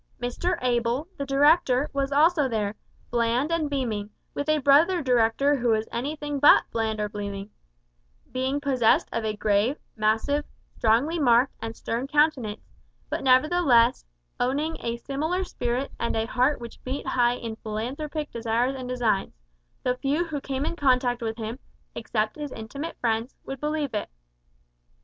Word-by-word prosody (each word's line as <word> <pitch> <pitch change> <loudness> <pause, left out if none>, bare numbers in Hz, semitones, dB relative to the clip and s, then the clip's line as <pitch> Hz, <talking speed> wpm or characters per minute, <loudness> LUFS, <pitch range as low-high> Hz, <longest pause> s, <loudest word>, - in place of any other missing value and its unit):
Mr 245 +9 -1
Able, 240 +4 0
the 280 - -5
director, 285 -1 +4
was 275 0 -1
also 300 0 +4
there, 210 -3 -1 0.4
bland 240 +5 +1
and 325 -3 0
beaming, 225 -7 -2 0.2
with 285 +1 -3
a 310 - +4
brother 300 +6 +4
director 250 +3 +3
who 245 -1 -1
was 220 -1 +2
anything 290 +3 -3
but 290 - +7
bland 220 -1 -1
or 210 - 0
beaming, 200 0 -6 0.8
being 260 +3 -1
possessed 260 -5 +3
of 230 - -1
a 215 -1 -1
grave, 210 +6 +1 0.2
massive, 225 +7 +1 0.3
strongly 250 +10 +2
marked 245 -1 +4
and 225 0 -5
stern 235 +5 -3
countenance; 280 -8 +1 0.5
but - - -2
nevertheless, 255 -2 +4 0.4
owning 290 +6 0
a 235 0 -3
similar 310 +9 -2
spirit 250 -5 -2
and 235 - -1
a 220 0 0
heart 255 +5 +1
which 235 -1 -10
beat 265 +2 -4
high 245 -1 +2
with 225 -2 -6
philanthropic 275 +8 -4
desires 235 +3 0
and 255 -1 -6
designs 230 - 0 0.5
though 250 - +2
few 290 +6 0
who 300 -4 -4
came 270 +1 -3
in 335 - -2
contact 255 -4 +2
with 225 -1 -3
him, 225 +2 -5 0.3
except 215 +1 -2
his 295 -2 -5
intimate 275 +9 -6
friends, 230 +1 -1
would 270 -1 -6
believe 300 -2 -2
it. 210 - -2
255 Hz, 155 wpm, -26 LUFS, 230-290 Hz, 0.8 s, but